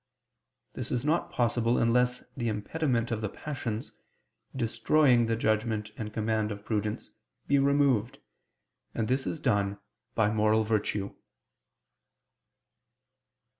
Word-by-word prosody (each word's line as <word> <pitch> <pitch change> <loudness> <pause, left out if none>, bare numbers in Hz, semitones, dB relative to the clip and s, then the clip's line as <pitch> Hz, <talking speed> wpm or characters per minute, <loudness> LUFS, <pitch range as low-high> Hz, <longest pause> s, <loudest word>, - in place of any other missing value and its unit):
This - - -5
is 125 +2 -1
not 165 +3 +1
possible 120 -3 +1
unless 125 +2 +2
the 120 -2 -2
impediment 120 +3 -1
of 110 -1 -1
the 105 - -2
passions, 120 -4 -5 0.6
destroying 120 +1 +3
the 115 - +1
judgment 110 -1 0
and 110 -4 -5
command 110 0 0
of 100 0 -7
prudence, 105 -1 -2 0.3
be 140 0 +3
removed; 135 -5 +2 0.8
and 110 - 0
this 130 +2 0
is 160 - -3
done 100 -7 +1 0.4
by 105 -2 +3
moral 110 0 +3
virtue. 105 -2 -1
115 Hz, 115 wpm, -29 LUFS, 105-125 Hz, 0.8 s, destroying